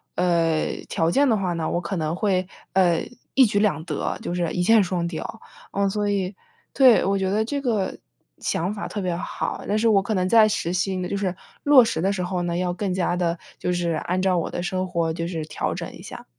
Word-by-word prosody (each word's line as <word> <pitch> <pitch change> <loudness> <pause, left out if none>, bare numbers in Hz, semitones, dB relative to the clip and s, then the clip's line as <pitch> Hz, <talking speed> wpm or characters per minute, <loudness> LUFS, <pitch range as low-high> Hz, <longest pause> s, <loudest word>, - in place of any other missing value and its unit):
呃， 170 -3 +1
条 165 +1 +1
件 280 +4 +3
的 220 - +3
话 185 -3 -1
呢， 165 -2 -2
我 175 - 0
可 185 +3 -4
能 155 0 -1
会， 185 -2 0 0.3
呃， 175 -3 +3 0.3
一 265 - +7
举 205 -2 +1
两 205 -6 +1
得， - - -2
就 - - -3
是 175 -2 -1
一 180 - 0
箭 220 +2 +5
双 175 -2 -1
雕。 170 +6 -6 0.3
嗯， 200 0 +1
所 205 +1 -1
以， 195 -1 -1 0.4
对， 255 -7 +6
我 195 - +2
觉 190 -1 0
得 215 +3 +1
这 280 +4 -2
个 220 -7 -1 0.4
想 180 +5 -1
法 210 - -5
特 210 - -5
别 180 -2 -1
好， 175 - -4
但 210 - +1
是 225 +1 +2
我 200 -3 +5
可 210 +3 -2
能 185 -1 +1
在 220 +2 +6
实 175 -4 -1
行 185 0 -1
就 - - -3
是 190 -2 -1 0.3
落 285 -3 +8
实 195 -8 -2
的 195 +3 +2
时 185 -2 -2
候 180 0 -2
呢， 175 -1 -1
要 180 0 0
更 200 0 -2
加 175 -1 0
地 175 -1 0 0.2
就 - - -1
是 175 -1 0
按 175 +3 -1
照 190 -1 +2
我 170 - -1
的 175 - -4
生 185 +1 -2
活 170 -2 -1
就 165 +1 -3
是 165 -3 -4
调 155 - -3
整 - - -6
一 - - -12
下。 - - -9
185 Hz, 255 characters per minute, -24 LUFS, 175-205 Hz, 0.4 s, 落